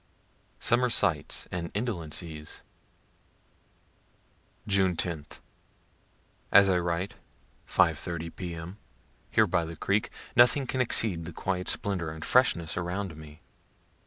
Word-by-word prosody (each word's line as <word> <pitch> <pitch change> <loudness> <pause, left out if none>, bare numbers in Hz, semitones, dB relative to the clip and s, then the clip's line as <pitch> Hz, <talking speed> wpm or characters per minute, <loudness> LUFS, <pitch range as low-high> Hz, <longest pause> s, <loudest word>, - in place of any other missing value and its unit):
SUMMER 125 +1 +3
SIGHTS 90 -10 +1
AND 85 -1 -3
INDOLENCIES 85 -7 -4 2.0
June 95 -3 +2
10th. 80 -3 -4 1.1
As 100 -1 +8
I 90 -2 +3
write, 85 +2 -2 0.5
5 - - +3
1/2 85 -1 -5
P.M., 85 +1 -6 0.5
here - - +4
by 85 - +1
the 80 +1 -6
creek, 100 +6 0 0.3
nothing 125 +3 +5
can 130 0 -1
exceed 100 -8 +2
the 85 - -6
quiet 90 +2 -2
splendor 95 -5 -1
and 80 0 -7
freshness 85 -11 +3
around 90 0 -3
me. 75 -1 -13
90 Hz, 110 wpm, -28 LUFS, 80-100 Hz, 2.0 s, As